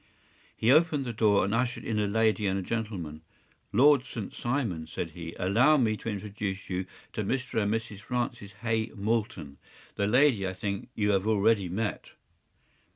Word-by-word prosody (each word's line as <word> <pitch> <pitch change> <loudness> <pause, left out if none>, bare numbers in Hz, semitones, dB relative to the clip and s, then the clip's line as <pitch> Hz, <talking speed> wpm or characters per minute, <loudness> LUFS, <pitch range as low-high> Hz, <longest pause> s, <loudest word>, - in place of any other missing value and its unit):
” - - -32
He 115 - +3
opened 155 -2 +4
the 120 - -3
door 105 -3 +3
and 100 - -1
ushered 120 +2 -1
in 110 -2 -1
a 105 - +1
lady 110 0 +2
and 95 -1 -1
gentleman. 95 -10 -4 0.5
“Lord 135 +5 +5
St. 115 -6 -6
Simon,” 115 - -2
said 80 0 -4
he, 85 0 -8
“allow 115 +12 +4
me 110 -5 +2
to 115 - -5
introduce 100 -2 -4
you 90 0 -2 0.3
to 105 - -2
Mr. 125 +1 -1
and 105 0 0
Mrs. 110 -2 -3
Francis 120 -3 -3
Hay 115 -1 +1
Moulton. 105 -9 -2 0.4
The 100 - +1
lady, 125 -4 +4
I 95 - -4
think, 100 +1 -4
you 105 -1 +2
have 100 +1 +1
already 105 -3 +3
met. 105 +4 -3
105 Hz, 170 wpm, -28 LUFS, 100-115 Hz, 0.5 s, Lord